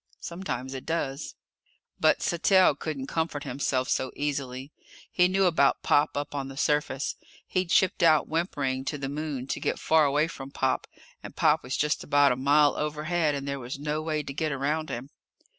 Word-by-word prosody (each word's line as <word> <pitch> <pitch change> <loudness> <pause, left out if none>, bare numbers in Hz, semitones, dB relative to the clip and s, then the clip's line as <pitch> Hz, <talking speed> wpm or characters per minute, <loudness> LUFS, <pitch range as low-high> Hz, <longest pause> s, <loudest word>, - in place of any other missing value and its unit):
Sometimes 150 -8 -5
it 130 - -6
does. 155 -3 -3 0.6
But - - +3
Sattell 185 +1 +4
couldn't 145 -4 -4
comfort 160 -1 -2
himself 130 0 -1
so 130 - -1
easily. 140 -2 -3 0.4
He 180 0 +4
knew 190 +1 +2
about 160 -6 +3
Pop, 145 0 +2
up 145 0 -3
on 140 -2 -3
the 135 0 -9
surface. 145 -2 0 0.3
He'd 185 -2 -1
shipped 190 +1 +3
out, 160 -3 +5
whimpering, 140 -6 -1
to 150 - -2
the 135 -1 -4
Moon 145 -3 -4
to - - -3
get - - -1
far 160 -1 +3
away 145 +3 +2
from 135 -5 -8
Pop, 135 -1 -1 0.3
and - - -10
Pop - - +3
was 130 - -3
just 150 0 0
about 145 -1 +4
a - - +1
mile 145 +3 +4
overhead 150 +1 0
and 140 0 -5
there 140 0 -3
was 125 +2 -6
no 150 +2 -2
way 155 -1 -2
to 140 - -6
get 155 +2 -1
around 150 +3 -1
him. 130 +4 -6
145 Hz, 185 wpm, -27 LUFS, 135-160 Hz, 0.6 s, out